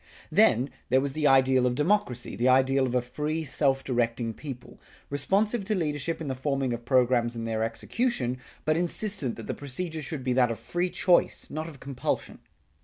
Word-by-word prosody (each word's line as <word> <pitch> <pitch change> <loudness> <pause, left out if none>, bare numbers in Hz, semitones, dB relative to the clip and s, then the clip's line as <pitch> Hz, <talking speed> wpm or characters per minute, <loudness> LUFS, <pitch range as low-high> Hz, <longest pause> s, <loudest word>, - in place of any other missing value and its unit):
Then, 130 - +4 0.2
there 130 +2 +4
was 140 0 -2
the 150 0 +1
ideal 130 -1 +5
of 125 - 0
democracy, 150 - 0
the 120 - +1
ideal 130 +1 +4
of 125 - -3
a 125 - +2
free 150 +5 -3
self 135 -3 +1
directing 115 -2 -1
people, 130 -1 -9 0.3
responsive 200 - +1
to 215 +1 0
leadership 155 -2 -2
in 160 - -5
the 135 - -1
forming 135 -1 -1
of 120 0 -6
programs 120 -2 +2
and 115 -1 -4
their 110 -1 -1
execution, 125 - -1 0.3
but 155 - +2
insistent 175 - 0
that 115 - -8
the - - -3
procedure 155 +4 -4
should 150 -3 -5
be 125 0 +1
that 125 -1 +4
of 115 - -3
free 175 +1 -2
choice, 180 0 +2
not 155 +2 -4
of 145 -4 -13
compulsion. 135 -1 -3
135 Hz, 185 wpm, -27 LUFS, 125-155 Hz, 0.3 s, ideal